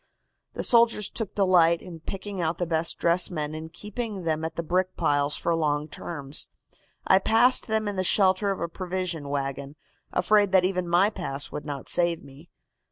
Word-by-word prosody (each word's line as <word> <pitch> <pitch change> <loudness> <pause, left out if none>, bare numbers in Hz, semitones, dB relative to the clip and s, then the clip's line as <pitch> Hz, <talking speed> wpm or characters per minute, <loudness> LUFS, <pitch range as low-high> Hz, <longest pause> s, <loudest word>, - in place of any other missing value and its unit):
The - - -4
soldiers 230 -3 +3
took 225 -5 -2
delight 175 -4 +4
in 175 -3 -10
picking 195 +3 -6
out 165 0 -1
the 175 - -1
best 165 0 0
dressed 170 +1 +2
men 150 -3 -4
and 160 +1 -7
keeping 210 +1 -6
them 160 -1 -1
at 160 0 -4
the 170 - -3
brick 185 +3 -1
piles 145 0 +2
for 170 - 0
long 150 -2 0
terms. 145 -3 -3 0.6
I 190 - +5
passed 235 +6 +3
them 220 -1 0
in 205 -1 -3
the 185 - +1
shelter 190 +1 +2
of 195 - -2
a - - -2
provision 180 -4 -4
wagon, 140 0 -4 0.4
afraid 205 +1 +3
that 185 -1 +5
even 180 -2 -1
my 180 +5 +4
pass 145 -8 -5
would 150 - -6
not 140 -3 -6
save 170 -1 +1
me. 140 +5 -15
175 Hz, 185 wpm, -26 LUFS, 155-195 Hz, 0.6 s, I